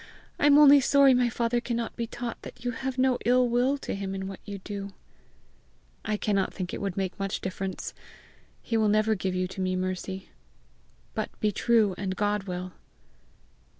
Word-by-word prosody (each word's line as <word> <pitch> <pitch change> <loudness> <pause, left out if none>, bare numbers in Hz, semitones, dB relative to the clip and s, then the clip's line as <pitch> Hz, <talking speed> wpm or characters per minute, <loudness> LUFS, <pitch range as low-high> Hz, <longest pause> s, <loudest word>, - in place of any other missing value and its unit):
I 290 - +4
am 290 0 +7
only 290 -1 +9
sorry 275 0 +5
my 245 -1 +3
father 235 +1 0
cannot 235 -1 -3
be 235 -1 -3
taught 240 0 -6
that 240 - -11
you 245 - +1
have 260 +2 -4
no 255 -1 +2
ill 250 +2 +4
will 245 +4 +2
to - - -5
him 195 -1 -4
in 190 0 -4
what 195 -1 -7
you 205 -1 -6
do." 200 0 -7 1.1
"I 215 -1 -1
cannot 200 -2 0
think 185 -2 -4
it - - -4
would 195 -2 -3
make 190 0 -2
much 195 0 -2
difference. 190 0 -4 0.7
He 230 - 0
will 215 -1 +3
never 215 +1 +3
give 190 -2 -2
you 185 0 0
to 190 - -6
me, 185 0 0
Mercy. 185 +1 -4 0.8
But - - -2
be 210 - +1
true, 220 -1 +3
and 190 -1 -2
God 205 -1 0
will." 180 -1 -5
210 Hz, 185 wpm, -27 LUFS, 190-240 Hz, 1.1 s, only